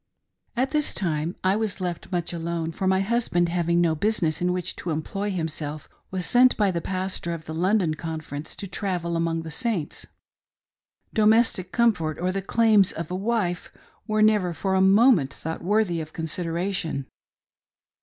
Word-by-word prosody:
At 260 +2 +1
this 300 -1 0
time 165 -2 -1
I 190 +1 +3
was 215 -3 -2
left 180 0 -4
much 175 -1 -2
alone, 165 -1 -3
for 190 +4 -2
my 190 0 +3
husband 195 -5 +1
having 170 0 +1
no 170 -2 +3
business 170 -2 0
in 180 0 +2
which 180 -1 -3
to 175 - -5
employ 180 +6 -2
himself 155 -4 -3 0.2
was 185 -1 -2
sent 250 +1 +5
by 205 -3 +3
the 170 -2 -2
Pas 185 +1 -3
tor 170 0 -3
of 160 -1 -10
the 160 - -6
London 180 0 +2
Conference 155 -2 -6
to 200 - -6
travel 180 -3 -2
among 165 0 0
the 160 - -7
Saints 210 - -2
•; - - -27 1.1
domestic 215 -4 +3
comfort 180 -11 +1
or 180 +2 0
the 195 +1 -2
claims 215 -1 +4
of 165 +1 -6
a - - -1
wife 195 -3 -1 0.4
were 215 0 +2
never 205 -5 +3
for 190 +2 -1
a 190 - +3
moment 195 - +5
thought 160 +3 -6
worthy 190 -3 +1
of 155 0 -9
consideration. 165 -2 -2
180 Hz, 175 wpm, -25 LUFS, 165-205 Hz, 1.1 s, sent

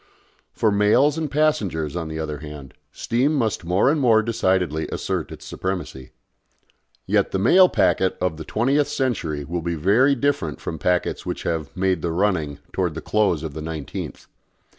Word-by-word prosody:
For 110 - +1
mails 105 +8 +4
and 160 -2 -2
passengers, 105 - 0
on 85 -2 -3
the 80 0 -5
other 75 -2 -4
hand, 75 -3 -9 0.2
steam 130 +6 0
must 110 -7 0
more 90 +6 +2
and 155 -1 0
more 115 -4 +4
decidedly 95 -8 0
assert - - -3
its - - -10
supremacy. 90 -9 -5 1.0
Yet - - +2
the - - -1
mail 180 - +6
packet 95 - +2
of 90 -3 -1
the 80 - -6
twentieth 135 - +1
century 120 - -2
will 85 +3 -3
be 85 0 -2
very 110 - +3
different 120 - -1
from 80 - -5
packets 90 +2 0
which - - -4
have 80 -4 -2
"made 95 -3 +1
the 85 - -1
running" 80 -6 0 0.2
towards 90 -5 -1
the 80 - -5
close 100 -8 +1
of 80 -3 -5
the 80 - -6
nineteenth. 80 -3 -6
95 Hz, 170 wpm, -22 LUFS, 80-115 Hz, 1.0 s, mail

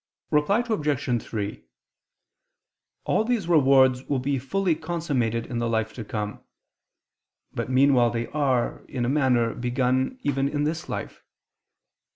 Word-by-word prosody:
Reply 175 +11 +3
Obj. 145 - 0
3: 105 -2 -5 1.4
All - - +1
these 225 -6 -1
rewards 135 -5 +4
will 140 - 0
be 135 +1 -1
fully 180 +7 0
consummated 150 -9 -2
in 120 -2 -4
the 120 0 -1
life 110 -1 -1
to 115 - -6
come: 105 -1 -5 1.1
but - - -3
meanwhile 130 -2 +4
they 115 0 -2
are, 135 -5 0
in 125 -2 -2
a - - 0
manner, 125 -5 +2
begun, 130 - 0
even 135 -1 0
in 145 0 -1
this 155 +2 -3
life. - - -5
130 Hz, 135 wpm, -25 LUFS, 120-150 Hz, 1.4 s, rewards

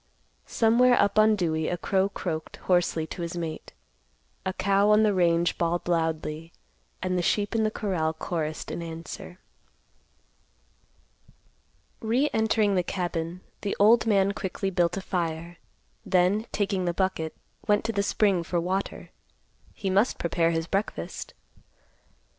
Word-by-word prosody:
Somewhere 245 +2 +4
up 200 +1 +3
on 215 0 +5
Dewey 160 -5 -1
a 175 - -1
crow 190 +3 +1
croaked 160 -5 -4
hoarsely 175 -3 +1
to 175 - -7
his 170 +1 -4
mate; 165 -2 -5 0.8
a - - +1
cow 200 +2 +2
on 210 +1 +5
the 210 -1 +3
range 170 -2 +2
bawled 170 +1 0
loudly 160 -1 -1 0.5
and 185 -1 0
the - - +1
sheep 205 +4 0
in 225 - +1
the 215 - +2
corral 185 -7 -1
chorused 160 -1 -4
in 170 - -4
answer. 165 +1 -8 2.6
Re 245 +7 +1
entering 220 -2 +2
the 185 - +3
cabin, 175 -1 -3 0.2
the 200 - -2
old 225 +3 +5
man 200 -2 +3
quickly 195 0 -3
built 175 0 +1
a - - -3
fire, 170 -2 -3 0.5
then, 190 +5 +2
taking 195 -3 -1
the 175 -1 -1
bucket, 180 -4 -1 0.3
went 205 0 +2
to 230 - 0
the 200 -2 0
spring 200 -2 +2
for 170 +1 -1
water. 185 +3 -3 0.6
He 195 -3 -3
must 200 +6 +2
prepare 170 -1 +1
his 165 -1 -1
breakfast. 195 +5 -3
185 Hz, 140 wpm, -27 LUFS, 170-205 Hz, 2.6 s, on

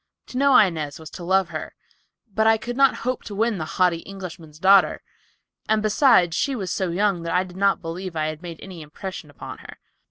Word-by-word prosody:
To 250 - -6
know 275 -2 +6
Inez 160 -7 +2
was 160 - -11
to 175 - -9
love 190 0 +2
her, 155 -2 -6 0.6
but 220 +2 +2
I 225 0 +5
could 245 +1 -6
not 275 0 +4
hope 255 0 -1
to 205 - -7
win 220 -1 0
the 155 - -3
haughty 180 -2 +3
Englishman's 175 -5 -10
daughter, 195 +4 +4 0.7
and 215 0 +2
besides 210 - +4
she 275 +7 0
was 195 -6 -4
so 190 -2 -1
young 190 0 +1
that 165 +1 -2
I 180 - +3
did 180 -1 -12
not 195 -1 +1
believe 170 +2 -5
I 155 -1 0
had 155 0 -4
made 170 -3 -8
any 185 -4 -9
impression 155 +2 -8
upon 145 - -9
her. - - -12
185 Hz, 215 wpm, -23 LUFS, 165-210 Hz, 0.7 s, know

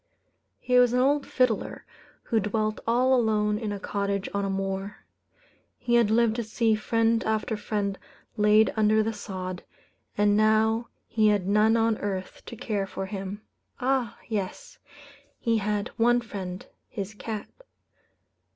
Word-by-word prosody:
He 250 0 +3
was 245 -1 +4
an 250 - +3
old 280 +2 +2
fiddler, 250 -4 0 0.4
who 225 - +1
dwelt 215 +1 -1
all 250 +3 +3
alone 210 -3 +2
in 220 -3 -3
a 205 - -4
cottage 200 -1 -2
on 200 0 -1
a 195 - -1
moor. 195 +1 -4 0.7
He 240 - -2
had 235 -3 +5
lived 225 0 +3
to 235 - -1
see 225 +1 +1
friend 225 +1 +1
after 220 +1 -1
friend 205 -2 -2 0.4
laid 210 0 +4
under 215 0 +3
the 225 +1 -2
sod, 185 -3 -6 0.5
and 205 0 +3
now 220 +2 +3 0.2
he 220 -1 +2
had 205 -3 +2
none 215 +3 +4
on 225 -1 +1
earth 190 -2 -4
to - - -7
care 210 -4 -2
for 195 - -5
him. 195 +1 -6 0.4
Ah! 255 -2 0
yes; 205 -5 -5 0.6
he 230 -1 +1
had 210 0 -1
one 240 +1 +4
friend 190 -5 -6 0.2
his 205 -2 -5
cat. 215 0 -6
215 Hz, 150 wpm, -26 LUFS, 200-230 Hz, 0.7 s, had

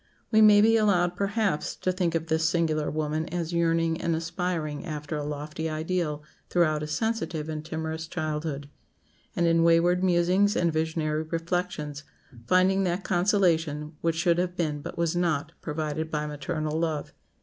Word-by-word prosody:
We 220 -1 +5
may 210 -1 +8
be 225 +1 +5
allowed, 180 -5 +2
perhaps, 200 -3 -1
to 185 - -1
think 180 -2 -1
of 165 0 -1
this 160 0 +1
singular 160 -3 0
woman 155 +1 -2
as 170 0 -3
yearning 165 -1 +1
and 165 - 0
aspiring 165 -2 -3
after 150 -3 -5
a 150 - -2
lofty 150 +2 -4
ideal 155 -1 -2 0.3
throughout 155 -4 +2
a 150 - -3
sensitive 165 -3 -2
and 155 -1 -4
timorous 160 0 -4
childhood; 155 -3 -3 0.7
and 170 - +2
in 165 0 +4
wayward 170 +2 +4
musings 185 +3 +3
and 170 -2 +1
visionary 155 -1 -1
reflections 165 -2 -3 0.4
finding 185 +3 +4
that 180 +1 -1
consolation 170 -5 +1
which 165 -1 +1
should 170 +1 +2
have 180 0 -1
been, 150 -4 -1
but - - -7
was 170 0 0
not, 160 -3 0
provided 155 0 -3
by 150 -1 -2
maternal 155 +1 -3
love. 160 -3 -2
165 Hz, 160 wpm, -27 LUFS, 155-180 Hz, 0.7 s, may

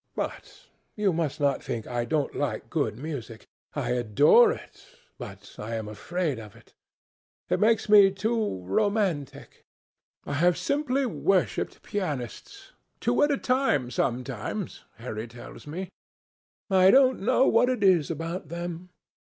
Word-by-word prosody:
But - - -6 0.3
you 205 -4 +1
must 160 -2 -2
not 140 -2 +1
think 115 -2 -4
I 120 -1 -2
don't 145 +3 -1
like 130 -7 -3
good 125 -10 -1
music. 130 -6 -7 0.3
I - - -2
adore 130 - +5
it, 485 - -9 0.4
but - - -10
I 110 +2 -4
am 110 -1 -4
afraid 150 - -3
of 105 -2 -11
it. - - -20 0.8
It - - +2
makes 225 0 +3
me 205 -2 +8
too 210 - -2
romantic. 175 - -1 0.6
I - - -4
have 170 +4 +3
simply 275 +7 0
worshipped 195 -6 0
pianists—two 205 - -4
at 290 - +4
a 285 - +1
time, 250 - +1
sometimes, 125 - -3
Harry 110 0 -6
tells 120 +5 -12
me. 180 +5 -6 0.8
I 190 -2 +5
don't 260 +2 +5
know 255 +6 +3
what 245 - +4
it 250 -5 -1
is 180 -6 +4
about 165 +1 -4
them. 175 +1 -6
170 Hz, 135 wpm, -27 LUFS, 125-210 Hz, 0.8 s, me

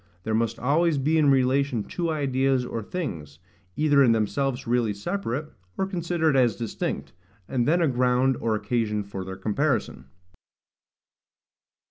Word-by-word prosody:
There 110 - -2
must 115 +1 0
always 150 +5 +2
be 155 +4 +2
in 150 -2 +4
relation 130 -3 +2
two 170 - -3
ideas 135 -4 +1
or 115 -2 -4
things, 85 - -5 0.4
either 145 -2 +4
in 120 -4 +5
themselves 125 +4 -1
really 115 -3 +1
separate, 150 - -3 0.2
or 190 - +1
considered 170 -5 0
as 125 -3 +3
distinct, 115 -2 -4 0.3
and 120 -3 0
then 170 +3 +3
a - - +3
ground 125 0 +2
or 115 -1 0
occasion 105 -2 -1
for 100 -1 -6
their 95 0 -7
comparison. 120 +8 -1
130 Hz, 140 wpm, -25 LUFS, 115-150 Hz, 0.4 s, in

